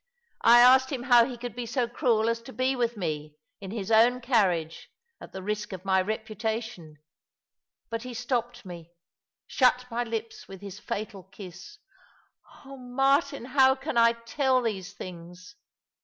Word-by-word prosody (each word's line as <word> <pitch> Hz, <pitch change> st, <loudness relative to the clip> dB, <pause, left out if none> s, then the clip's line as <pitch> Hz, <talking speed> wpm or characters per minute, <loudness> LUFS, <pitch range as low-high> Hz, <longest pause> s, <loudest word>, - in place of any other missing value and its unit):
I 240 Hz, +1 st, +7 dB
asked 260 Hz, +1 st, +6 dB
him 255 Hz, -3 st, -3 dB
how 245 Hz, -3 st, +6 dB
he 250 Hz, -1 st, -7 dB
could 240 Hz, -1 st, -7 dB
be 240 Hz, -1 st, -5 dB
so 245 Hz, +1 st, -1 dB
cruel 235 Hz, -3 st, +1 dB
as 230 Hz, 0 st, -1 dB
to 255 Hz, +3 st, -12 dB
be 260 Hz, +1 st, 0 dB
with 235 Hz, -2 st, -1 dB
me, 155 Hz, -4 st, -4 dB, 0.2 s
in 195 Hz, -2 st, -8 dB
his 210 Hz, 0 st, -5 dB
own 235 Hz, +3 st, +5 dB
carriage, 190 Hz, -10 st, 0 dB, 0.3 s
at -, -, -11 dB
the 190 Hz, -, -8 dB
risk 210 Hz, 0 st, -4 dB
of 185 Hz, 0 st, -8 dB
my 190 Hz, -1 st, +3 dB
reputation 220 Hz, -5 st, -5 dB, 0.5 s
— -, -, -59 dB
but 230 Hz, 0 st, -3 dB
he 250 Hz, 0 st, -8 dB
stopped 240 Hz, -1 st, -3 dB
me 170 Hz, -2 st, -10 dB, 0.3 s
— -, -, -67 dB
shut 250 Hz, -1 st, +2 dB
my 240 Hz, +1 st, -1 dB
lips 225 Hz, -1 st, -6 dB
with 195 Hz, -1 st, -10 dB
his 200 Hz, 0 st, -9 dB
fatal 205 Hz, -2 st, -5 dB
kiss. 190 Hz, -, -12 dB, 0.9 s
Oh, 275 Hz, 0 st, -10 dB
Martin, 270 Hz, +2 st, 0 dB
how 265 Hz, 0 st, +4 dB
can 270 Hz, +1 st, -5 dB
I 230 Hz, 0 st, +5 dB
tell 255 Hz, +2 st, 0 dB
these 200 Hz, -4 st, -3 dB
things? 180 Hz, +2 st, -11 dB
230 Hz, 170 wpm, -27 LUFS, 195-250 Hz, 0.9 s, I